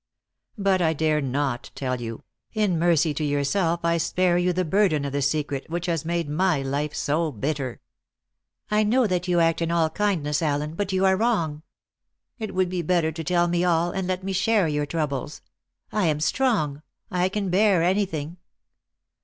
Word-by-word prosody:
But 195 -2 +2
I 160 -1 +2
dare 155 0 +1
not 135 -2 -2
tell 130 -2 -3
you; 115 -1 -6 0.3
in 205 -6 +1
mercy 165 -2 +3
to 155 - -3
yourself 160 +4 0
I 170 0 +2
spare 180 +2 +1
you 180 +1 +2
the 180 +1 -1
burden 160 -5 +2
of 140 - -3
the 140 - 0
secret 140 0 -1
which 170 +1 -3
has 165 -4 -1
made 170 -1 -1
my 155 -1 +1
life 140 +2 -2
so 155 +2 0
bitter." 135 +1 -3 0.9
"I 210 0 +3
know 235 +4 +3
that 180 -3 -1
you 175 -1 +2
act 165 0 +2
in 165 - 0
all 165 -2 +1
kindness, 170 -8 0
Allen, 150 0 -1
but 200 +3 -3
you 190 0 +2
are 190 0 +4
wrong. 185 -9 0 0.8
It 215 -4 -5
would 185 0 +2
be 180 -1 -2
better 170 -1 +1
to 160 +1 -6
tell 175 +2 +2
me 175 0 +1
all, 175 -1 +2
and 190 -1 -3
let 185 0 -2
me 195 0 -3
share 195 0 +2
your 150 -1 -1
troubles. 150 -3 -3 0.5
I 210 -5 +1
am 150 -2 +1
strong; 155 - 0 0.3
I 180 0 +1
can 200 -2 -2
bear 195 -2 +4
anything." 175 -4 -1
170 Hz, 185 wpm, -24 LUFS, 150-185 Hz, 0.9 s, are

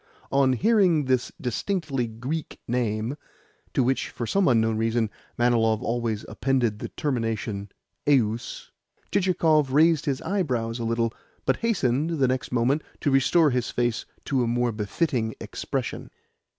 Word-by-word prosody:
On 135 -1 +4
hearing 185 - +3
this 130 -1 +1
distinctly 135 - -1
Greek 125 +8 -5
name 115 +1 -1 0.6
(to 130 - +4
which, 130 +2 0
for 120 - -5
some 195 - +2
unknown 115 -2 +3
reason, 115 0 0 0.3
Manilov 115 -2 +2
always 115 -3 -1
appended 120 -2 0
the - - -5
termination 110 -7 -2 0.4
"eus"), 120 -5 +1 0.4
Chichikov 165 -7 +3
raised 160 +1 +4
his 135 -2 0
eyebrows 130 - -1
a 115 - -2
little, 115 0 0 0.3
but 130 - +2
hastened, 160 - 0
the 135 -2 +3
next 130 +2 -2
moment, 125 +5 +2 0.2
to 145 - +1
restore 145 +4 +4
his 125 -1 0
face 120 -1 -1 0.2
to 135 -3 +1
a - - 0
more 120 +1 +1
befitting 110 - -1
expression. - - -4
125 Hz, 135 wpm, -25 LUFS, 115-145 Hz, 0.6 s, On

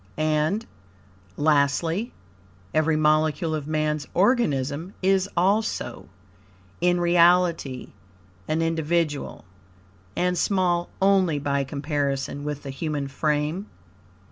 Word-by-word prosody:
And, 155 +7 0 0.7
lastly, 160 - +1 0.6
every 155 0 +2
molecule 155 +1 +2
of 150 -2 -3
Man's 155 -1 -1
organism 170 - +1
is 190 0 +2
also, 200 +5 0 0.7
in 175 0 +3
reality, 170 -5 +2 0.5
an 160 +1 0
individual, 165 -2 -1 0.7
and 180 0 +1
small 180 -3 +1
only 190 -5 +3
by 140 -1 0
comparison 140 0 -2
with 145 -1 -4
the 135 - -5
human 145 0 -3
frame. 150 +6 -1
155 Hz, 90 wpm, -24 LUFS, 145-175 Hz, 0.7 s, in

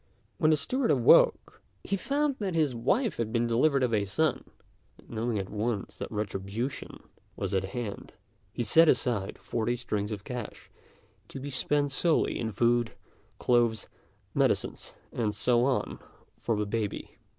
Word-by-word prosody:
When 155 - +4
the 155 - +4
steward 255 - -1
awoke, 130 -5 +4 0.2
he 200 - -1
found 280 +6 0
that 190 -5 -2
his 155 -5 +2
wife 185 - 0
had 115 -2 -2
been 120 0 +1
delivered 130 +4 +2
of 120 -2 +1
a 105 -2 +2
son; 155 +8 0 0.5
and, - - -21
knowing 115 0 -1
at 95 -1 -4
once 105 -1 -2
that - - -6
retribution 105 +5 -4 0.3
was 100 -1 -3
at 95 0 +1
hand, 105 +1 -6 0.4
he 120 - -3
set 160 +8 +6
aside 115 -5 0
forty 120 +1 -2
strings 105 -3 -3
of 100 -3 -5
cash 120 -2 -7 0.6
to - - -8
be 140 +2 -6
spent 145 +1 +1
solely 160 +4 +2
in 110 -1 -2
food, 120 +2 +1 0.4
clothes, 120 -3 +2 0.5
medicines, - - 0 0.2
and 110 -3 -1
so 120 -1 +2
on, 135 -2 -1 0.4
for 115 - 0
the 105 - 0
baby. 105 -1 -4
120 Hz, 155 wpm, -29 LUFS, 105-140 Hz, 0.6 s, set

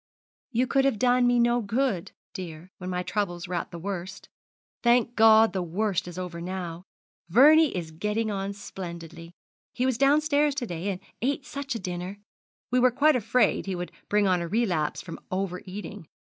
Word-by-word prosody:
'You 250 0 +1
could 270 +1 +2
have 270 -5 +2
done 245 +2 +3
me 245 0 +3
no 240 0 +3
good, 220 -3 -1 0.2
dear, 180 -2 -8
when 180 -1 -5
my 180 0 -2
troubles 180 -3 -2
were 180 - -5
at - - -2
the 170 - -8
worst. 185 +1 -6 0.5
Thank 240 0 +3
God 220 -2 +6
the 190 - -1
worst 185 +2 -1
is 175 0 -8
over 180 -2 -5
now 175 -1 -5 0.4
Vernie 295 - +6
is 165 -2 -5
getting 210 +6 -1
on 195 0 -2
splendidly. 170 -4 -8 0.4
He 250 - 0
was 260 -3 0
downstairs 290 +1 +3
to 270 -4 -2
day, 175 -1 -4
and 185 -2 -4 0.2
ate 275 +3 -1
such 280 -3 -5
a - - -3
dinner. 180 +1 -5 0.5
We 250 - +3
were 255 +1 +5
quite 285 +5 +3
afraid 245 -2 +2
he 190 - -2
would 175 0 -5 0.2
bring 210 0 +3
on 180 -2 +2
a 170 - -3
relapse 175 -7 0
from 165 - -8
over 185 -1 -2
eating. 185 -4 -8
200 Hz, 185 wpm, -27 LUFS, 180-245 Hz, 0.5 s, God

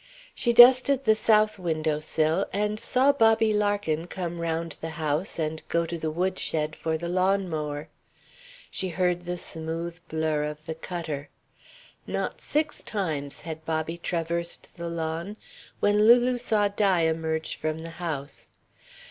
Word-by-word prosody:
She 240 - +1
dusted 255 +3 +7
the 220 - +5
south 215 -1 +3
window 155 -3 -1
sill 155 +4 +1
and 210 +1 -1
saw 260 +5 +3
Bobby 225 -4 +4
Larkin 205 -6 0
come 175 -2 -5
round 165 0 -2
the 165 - -4
house 155 +4 -1
and 155 -1 -2
go 170 0 +1
to 170 - -4
the 160 -1 -2
wood 185 +4 -1
shed 155 0 -1
for 160 0 -2
the 170 +2 -5
lawn 185 +2 +1
mower. 150 -2 -4 0.8
She 190 - -2
heard 175 0 0
the 180 0 -3
smooth 165 +1 -4
blur 155 -2 0
of 150 0 -7
the 160 - -3
cutter. 160 -3 -5 0.8
Not - - -3
six 300 0 -1
times 155 -9 -3
had 160 -1 -7
Bobby 160 +1 -2
traversed 170 0 -3
the 170 0 -5
lawn 165 +4 -4 0.4
when 210 +1 +4
Lulu 245 +1 +5
saw 215 -4 +2
Di 200 -3 +2
emerge 160 0 -1
from 155 +1 -3
the 165 - -7
house. 145 -5 -5
170 Hz, 150 wpm, -26 LUFS, 160-205 Hz, 0.8 s, dusted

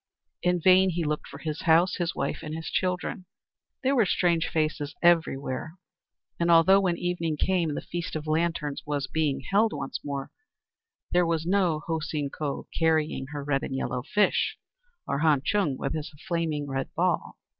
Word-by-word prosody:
In 180 0 +2
vain 185 +2 +6
he 170 -1 -1
looked 150 -1 -2
for 140 - -10
his 155 +1 -4
house, 170 +2 +4
his 170 -2 -2
wife, - - -2
and 155 -1 -5
his 160 0 -5
children. 180 0 -1 0.6
There 270 +1 +2
were 230 -6 +4
strange 170 -2 +2
faces 155 -2 -1
everywhere; 160 -3 +1 0.6
and 170 0 +1
although 170 +4 +7
when 180 -3 +1
evening 170 -3 -1
came 170 -3 +1
the - - -3
Feast 170 -1 -5
of 155 -1 -4
Lanterns 155 -2 -1
was 145 -2 -2
being 140 -1 -1
held 210 +9 +2
once - - -4
more, 140 -1 -4 0.8
there 180 0 +4
was 165 -1 0
no 180 -4 +2
Ho 165 -1 -1
Seen 150 -2 -3
Ko 145 -3 -4
carrying 160 -4 +1
her 145 0 -6
red 140 -1 0
and 135 - -4
yellow 130 -1 -2
fish, 205 +10 +1 0.5
or 140 - -1
Han 150 -3 +3
Chung 160 -8 +1
with 140 - -2
his 155 -1 -4 0.2
flaming 160 -4 -1
red 135 -1 -3
ball. - - 0
160 Hz, 175 wpm, -27 LUFS, 145-175 Hz, 0.8 s, although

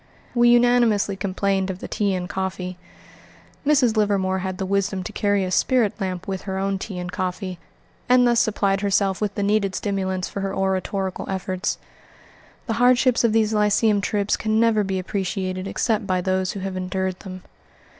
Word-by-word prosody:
We 240 -1 +4
unanimously 240 -4 +4
complained 195 0 -1
of 185 - -3
the - - -7
tea 200 -2 0
and 180 -1 -3
coffee. 185 -1 -4 0.8
Mrs. 275 -6 +3
Livermore 195 -3 +1
had 185 0 -4
the 190 - -2
wisdom 195 -1 -1
to - - -7
carry 205 -1 +1
a 185 - -4
spirit 235 +1 +2
lamp 185 -1 -3
with 190 -1 -3
her 190 - -2
own 195 0 -1
tea 195 -1 -6
and 180 0 -5
coffee, 185 0 -4 0.5
and 250 0 +6
thus 235 -1 +3
supplied 200 -3 +1
herself 200 -1 +1
with 205 -2 -1
the 205 - -1
needed 200 -1 +1
stimulants 190 -3 -2
for 200 - -5
her 195 0 -3
oratorical 190 0 -2
efforts. 185 0 -2 0.9
The 225 - -1
hardships 250 0 +4
of 230 - +3
these 220 0 +2
lyceum 210 0 +3
trips 205 0 0
can 215 0 0
never 225 -2 +3
be 190 -1 -2
appreciated 185 0 -3
except 210 0 -1
by 185 -2 +1
those 185 0 0
who 195 - -6
have 190 0 -4
endured 185 0 -2
them. 185 -2 -9
195 Hz, 175 wpm, -23 LUFS, 185-210 Hz, 0.9 s, and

